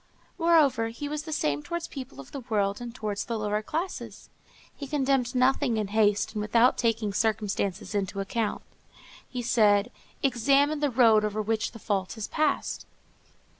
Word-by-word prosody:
Moreover, 310 Hz, -9 st, +4 dB
he 235 Hz, +6 st, -6 dB
was 300 Hz, 0 st, -3 dB
the 315 Hz, -, -6 dB
same 150 Hz, -, 0 dB
towards 340 Hz, -, -4 dB
people 260 Hz, -, -9 dB
of 135 Hz, -, -11 dB
the 280 Hz, -, -5 dB
world 210 Hz, -4 st, -1 dB
and 240 Hz, -1 st, -5 dB
towards 210 Hz, -4 st, -3 dB
the 230 Hz, -, -3 dB
lower 210 Hz, 0 st, -1 dB
classes. 330 Hz, -, -5 dB, 0.4 s
He 280 Hz, -, -7 dB
condemned 265 Hz, -3 st, 0 dB
nothing 255 Hz, -1 st, +2 dB
in 210 Hz, -2 st, -2 dB
haste 210 Hz, -1 st, +2 dB
and 210 Hz, -, -2 dB
without 230 Hz, +4 st, +4 dB
taking 225 Hz, -3 st, 0 dB
circumstances 210 Hz, -2 st, -1 dB
into 200 Hz, -1 st, -2 dB
account. 210 Hz, +2 st, -2 dB, 0.7 s
He 250 Hz, -1 st, -4 dB
said, 210 Hz, -1 st, +3 dB, 0.3 s
"Examine 275 Hz, +4 st, +3 dB
the 290 Hz, -1 st, +1 dB
road 225 Hz, -4 st, +5 dB
over 210 Hz, 0 st, -2 dB
which 220 Hz, +1 st, -1 dB
the -, -, -10 dB
fault 195 Hz, -4 st, -2 dB
has 220 Hz, -2 st, -5 dB
passed." 305 Hz, -2 st, -1 dB
225 Hz, 165 wpm, -27 LUFS, 210-270 Hz, 0.7 s, road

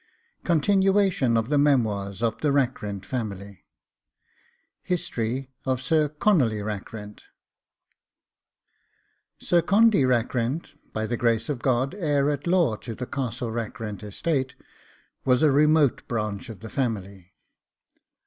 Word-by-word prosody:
CONTINUATION 190 Hz, -, +3 dB
OF 115 Hz, +2 st, -1 dB
THE 145 Hz, -1 st, +3 dB
MEMOIRS 110 Hz, -8 st, +1 dB
OF 115 Hz, -2 st, -1 dB
THE 150 Hz, -, +2 dB
RACKRENT 115 Hz, -8 st, -1 dB
FAMILY 100 Hz, -5 st, -5 dB, 1.2 s
HISTORY 130 Hz, -6 st, -2 dB
OF 130 Hz, -2 st, 0 dB
SIR 150 Hz, +3 st, +2 dB
CONOLLY 140 Hz, -, +2 dB
RACKRENT 105 Hz, 0 st, -7 dB, 2.1 s
Sir 175 Hz, -1 st, +2 dB
Condy 210 Hz, -4 st, +4 dB
Rackrent, 125 Hz, +3 st, 0 dB, 0.2 s
by 110 Hz, 0 st, -2 dB
the 120 Hz, +2 st, -2 dB
grace 115 Hz, +3 st, +1 dB
of 140 Hz, -4 st, -2 dB
God 130 Hz, +3 st, +1 dB
heir 150 Hz, -7 st, +1 dB
at 145 Hz, +3 st, -4 dB
law 170 Hz, -10 st, +3 dB
to 115 Hz, 0 st, -7 dB
the 125 Hz, -, -5 dB
Castle 125 Hz, -3 st, -3 dB
Rackrent 110 Hz, -2 st, -5 dB
estate, 130 Hz, +6 st, -2 dB, 0.7 s
was 125 Hz, +2 st, +3 dB
a 150 Hz, -, +5 dB
remote 150 Hz, -1 st, +3 dB
branch 105 Hz, -2 st, -3 dB
of 105 Hz, -5 st, -9 dB
the 110 Hz, -, -8 dB
family. 100 Hz, -8 st, -3 dB
125 Hz, 120 wpm, -25 LUFS, 110-150 Hz, 2.1 s, a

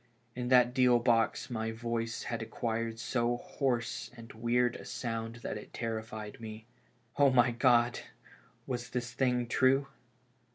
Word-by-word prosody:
In 125 Hz, 0 st, -3 dB
that 125 Hz, -1 st, +5 dB
deal 125 Hz, -2 st, +5 dB
box 115 Hz, +1 st, +1 dB
my 110 Hz, -1 st, -2 dB
voice 115 Hz, 0 st, -3 dB
had 115 Hz, -1 st, -3 dB
acquired 115 Hz, 0 st, -2 dB
so 120 Hz, +1 st, 0 dB
hoarse 120 Hz, -4 st, -2 dB
and 115 Hz, -1 st, -11 dB
weird 120 Hz, +2 st, +1 dB
a -, -, -10 dB
sound 115 Hz, -1 st, -4 dB
that 105 Hz, -, -3 dB
it -, -, -13 dB
terrified 110 Hz, -2 st, -5 dB
me. 110 Hz, 0 st, -8 dB, 0.5 s
Oh, 140 Hz, -1 st, +7 dB
my 125 Hz, -2 st, +4 dB
God! 120 Hz, 0 st, +3 dB, 0.7 s
was 125 Hz, -1 st, -4 dB
this 125 Hz, -1 st, -3 dB
thing 125 Hz, -2 st, +1 dB
true? 130 Hz, +3 st, +3 dB
120 Hz, 140 wpm, -31 LUFS, 115-125 Hz, 0.7 s, Oh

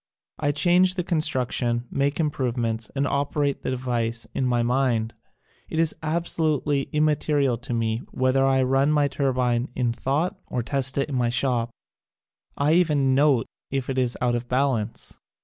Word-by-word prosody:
I 145 Hz, -1 st, +1 dB
change 180 Hz, +5 st, +3 dB
the 180 Hz, -, -1 dB
construction, 130 Hz, -7 st, +1 dB
make 140 Hz, +2 st, 0 dB
improvements 120 Hz, -7 st, -1 dB
and 140 Hz, 0 st, +1 dB
operate 140 Hz, 0 st, -1 dB
the -, -, -3 dB
device 120 Hz, -3 st, -2 dB
in 130 Hz, -, 0 dB
my 120 Hz, -1 st, +1 dB
mind. 120 Hz, -2 st, 0 dB, 0.6 s
It -, -, -4 dB
is 165 Hz, -1 st, +2 dB
absolutely 155 Hz, -3 st, -1 dB
immaterial 150 Hz, -4 st, +1 dB
to 120 Hz, -, -8 dB
me 115 Hz, -1 st, 0 dB
whether 130 Hz, +1 st, +1 dB
I 135 Hz, -1 st, +3 dB
run 135 Hz, +3 st, +2 dB
my 150 Hz, -1 st, +3 dB
turbine 130 Hz, -3 st, 0 dB
in 120 Hz, -2 st, 0 dB
thought 145 Hz, +9 st, -1 dB
or 125 Hz, -, -2 dB
test 135 Hz, +1 st, +1 dB
it 140 Hz, -, +1 dB
in 145 Hz, -, -6 dB
my 125 Hz, -2 st, +1 dB
shop. 120 Hz, -1 st, 0 dB, 0.5 s
/ -, -, -28 dB
even 150 Hz, -6 st, +3 dB
note 135 Hz, -3 st, +3 dB, 0.2 s
if 135 Hz, -1 st, -2 dB
it 130 Hz, -, -1 dB
is 125 Hz, -1 st, 0 dB
out 120 Hz, -1 st, +2 dB
of 120 Hz, 0 st, -3 dB
balance. 125 Hz, -4 st, -1 dB
135 Hz, 160 wpm, -24 LUFS, 120-145 Hz, 0.6 s, change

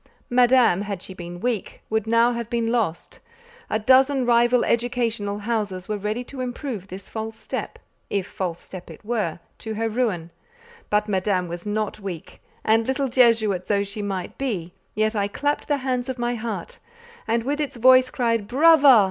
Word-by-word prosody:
Madame, 245 Hz, -6 st, +5 dB
had 200 Hz, -2 st, -4 dB
she 190 Hz, -, -8 dB
been 175 Hz, -1 st, -8 dB
weak, 235 Hz, -1 st, -3 dB
would 220 Hz, 0 st, -1 dB
now 230 Hz, +1 st, +4 dB
have 235 Hz, -1 st, -4 dB
been 230 Hz, -2 st, 0 dB
lost: 215 Hz, -9 st, -2 dB, 0.5 s
a -, -, +1 dB
dozen 260 Hz, +3 st, +4 dB
rival 240 Hz, +1 st, +4 dB
educational 235 Hz, -4 st, 0 dB
houses 205 Hz, -4 st, -2 dB
were 215 Hz, -, -1 dB
ready 210 Hz, +4 st, -3 dB
to 260 Hz, +1 st, -8 dB
improve 245 Hz, -5 st, -5 dB
this 190 Hz, +1 st, -9 dB
false 220 Hz, 0 st, -5 dB
step—if 200 Hz, -3 st, -5 dB
false 180 Hz, -4 st, -4 dB
step 180 Hz, -2 st, -10 dB
it 160 Hz, +5 st, -12 dB
were—to 220 Hz, 0 st, -4 dB
her 225 Hz, +1 st, -1 dB
ruin; 210 Hz, -8 st, -1 dB, 0.6 s
but 210 Hz, 0 st, +2 dB
Madame 190 Hz, -2 st, 0 dB
was 175 Hz, +3 st, -7 dB
not 215 Hz, 0 st, -2 dB
weak, 190 Hz, -6 st, -8 dB, 0.2 s
and 225 Hz, +1 st, +3 dB
little 265 Hz, 0 st, 0 dB
Jesuit 225 Hz, -7 st, +3 dB
though 200 Hz, -1 st, +2 dB
she 200 Hz, +1 st, -6 dB
might 195 Hz, -3 st, -4 dB
be, 190 Hz, -11 st, -3 dB, 0.2 s
yet 215 Hz, +1 st, +1 dB
I 200 Hz, -1 st, +1 dB
clapped 290 Hz, +8 st, -2 dB
the 290 Hz, -, +1 dB
hands 250 Hz, -1 st, -1 dB
of 260 Hz, -, -3 dB
my 240 Hz, 0 st, -1 dB
heart, 220 Hz, -6 st, -5 dB, 0.5 s
and 230 Hz, +1 st, +1 dB
with 290 Hz, +4 st, -1 dB
its 290 Hz, -, -3 dB
voice 255 Hz, +1 st, +6 dB
cried 230 Hz, -5 st, 0 dB
"brava!" 285 Hz, -2 st, +7 dB
225 Hz, 170 wpm, -23 LUFS, 200-245 Hz, 0.6 s, brava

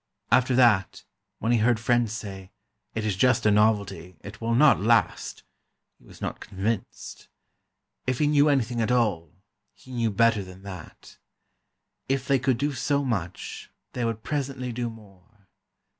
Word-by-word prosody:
After 125 Hz, 0 st, +4 dB
that, 115 Hz, -7 st, +3 dB, 0.3 s
when 115 Hz, -, -1 dB
he 120 Hz, -, +3 dB
heard 115 Hz, +1 st, +3 dB
friends 120 Hz, -1 st, +1 dB
say: 95 Hz, -4 st, -7 dB, 0.5 s
"It 110 Hz, -1 st, -2 dB
is 105 Hz, -3 st, 0 dB
just 125 Hz, +6 st, +2 dB
a 105 Hz, -, +5 dB
novelty—it 100 Hz, -1 st, 0 dB
will 115 Hz, +1 st, 0 dB
not 145 Hz, +3 st, +6 dB
last," 110 Hz, -3 st, +1 dB, 0.6 s
he -, -, -25 dB
was -, -, -15 dB
not -, -, -4 dB
convinced. 100 Hz, +2 st, -4 dB, 0.8 s
If 130 Hz, -1 st, 0 dB
he 150 Hz, -, +2 dB
knew 145 Hz, 0 st, +4 dB
anything 120 Hz, -4 st, +1 dB
at 110 Hz, -, 0 dB
all, 100 Hz, -11 st, +1 dB, 0.4 s
he 130 Hz, -, -16 dB
knew 120 Hz, -2 st, 0 dB
better 110 Hz, 0 st, +2 dB
than 95 Hz, +1 st, -13 dB
that. 95 Hz, -5 st, -11 dB, 0.9 s
If 135 Hz, 0 st, -1 dB
they 135 Hz, -1 st, +3 dB
could 130 Hz, -1 st, +1 dB
do 145 Hz, +3 st, -1 dB
so 140 Hz, +1 st, 0 dB
much, 95 Hz, -8 st, -4 dB, 0.2 s
they 125 Hz, -, -2 dB
would 115 Hz, -1 st, -2 dB
presently 135 Hz, -4 st, -3 dB
do 120 Hz, 0 st, -3 dB
more. 105 Hz, -1 st, -17 dB
115 Hz, 155 wpm, -26 LUFS, 100-125 Hz, 0.9 s, not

